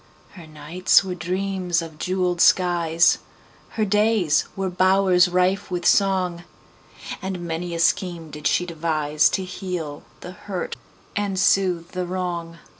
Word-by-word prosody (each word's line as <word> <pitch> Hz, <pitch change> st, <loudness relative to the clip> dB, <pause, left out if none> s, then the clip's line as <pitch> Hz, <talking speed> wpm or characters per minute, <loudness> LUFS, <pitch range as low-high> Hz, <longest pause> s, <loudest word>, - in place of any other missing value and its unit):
Her 175 Hz, -5 st, -13 dB
nights 165 Hz, +6 st, +2 dB
were 185 Hz, -1 st, -4 dB
dreams 180 Hz, 0 st, -2 dB
of 160 Hz, -2 st, -8 dB
jeweled 180 Hz, -1 st, -1 dB
skies, 170 Hz, -2 st, +3 dB, 0.6 s
Her 215 Hz, -, +2 dB
days 210 Hz, -6 st, +2 dB
were 190 Hz, -1 st, -2 dB
bowers 185 Hz, -1 st, +3 dB
rife 180 Hz, +2 st, +1 dB
with 175 Hz, -1 st, -3 dB
song, 185 Hz, -3 st, +2 dB, 0.8 s
And 190 Hz, -2 st, -4 dB
many 170 Hz, 0 st, -4 dB
a -, -, -4 dB
scheme 170 Hz, -2 st, 0 dB
did 150 Hz, -1 st, -3 dB
she 180 Hz, -, +1 dB
deviseTo 155 Hz, +1 st, 0 dB
heal 180 Hz, -6 st, -5 dB, 0.2 s
the 180 Hz, -, -8 dB
hurt 185 Hz, 0 st, -6 dB, 0.4 s
and 200 Hz, -2 st, -2 dB
soothe 180 Hz, -3 st, +2 dB
the 180 Hz, -1 st, -3 dB
wrong. 175 Hz, -2 st, -4 dB
180 Hz, 130 wpm, -22 LUFS, 170-190 Hz, 0.8 s, skies